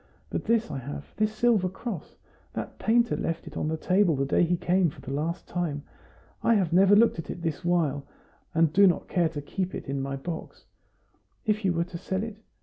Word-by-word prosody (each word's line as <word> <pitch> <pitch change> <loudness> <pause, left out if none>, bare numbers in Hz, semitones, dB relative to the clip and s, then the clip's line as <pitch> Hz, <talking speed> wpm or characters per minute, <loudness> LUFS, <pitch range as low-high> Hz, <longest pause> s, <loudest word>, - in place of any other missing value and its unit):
But - - -2
this 230 +1 +2
I 140 - -3
have 145 +3 -8
this 215 0 +2
silver 215 -4 +2
cross. 190 -2 -6 0.4
That - - -6
painter 235 +1 +3
left 165 0 -3
it - - -10
on - - -1
the 160 +1 -1
table 185 0 +3
the 135 0 0
day 140 - +2
he 175 +1 +2
came 180 0 +2
for - - -13
the 135 - -7
last 160 +4 -2
time. 160 -5 -2 0.6
I 230 - +4
have 180 -5 +1
never 195 +3 +6
looked 225 -4 +4
at 155 - -6
it - - -4
all 170 - -11
this 165 +1 -2
while, 155 -5 +1 0.5
and 160 -2 +3
do 200 +1 +7
not 175 - +1
care 170 -3 +2
to 150 -3 -6
keep 185 +4 -3
it - - -6
in 135 0 -2
my 135 0 -3
box; 160 +4 -7 0.8
if 215 0 +1
you 190 - +3
were 170 0 +1
to 170 -1 -8
sell 190 +3 -2
it? 220 -2 -6
175 Hz, 225 wpm, -27 LUFS, 155-200 Hz, 0.8 s, do